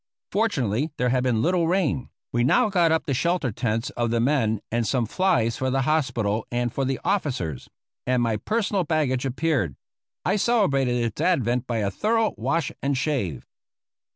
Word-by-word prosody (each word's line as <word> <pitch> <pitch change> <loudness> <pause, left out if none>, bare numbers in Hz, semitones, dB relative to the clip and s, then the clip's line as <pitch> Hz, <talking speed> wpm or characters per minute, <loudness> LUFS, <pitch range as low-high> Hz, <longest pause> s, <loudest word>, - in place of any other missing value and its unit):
Fortunately 150 - 0
there 125 - +1
had 125 +1 +2
been 120 -3 +1
little 175 -1 +2
rain. 165 -8 0 0.2
We 120 0 +1
now 140 - +3
got 175 -4 +3
up 160 - +1
the 140 - -1
shelter 170 -1 0
tents 115 +1 -2
of 120 -1 -1
the 115 0 +1
men 115 -4 +1
and 115 -1 0
some 125 -3 +1
flies 140 - +1
for 130 - -1
the 135 +1 +1
hospital 120 -8 0
and 120 -1 -1
for 135 - -1
the 135 0 -1
officers; 130 - -2 0.4
and 125 -1 +2
my 115 -2 +1
personal 205 - 0
baggage 145 -5 0
appeared. 130 - 0 0.5
I 195 +3 +2
celebrated 140 - +2
its 115 -3 -2
advent 125 -8 +1
by 120 - -1
a 100 -3 0
thorough 225 - +1
wash 165 -3 -1
and 140 -1 0
shave. 125 - -2
130 Hz, 175 wpm, -24 LUFS, 115-165 Hz, 0.5 s, now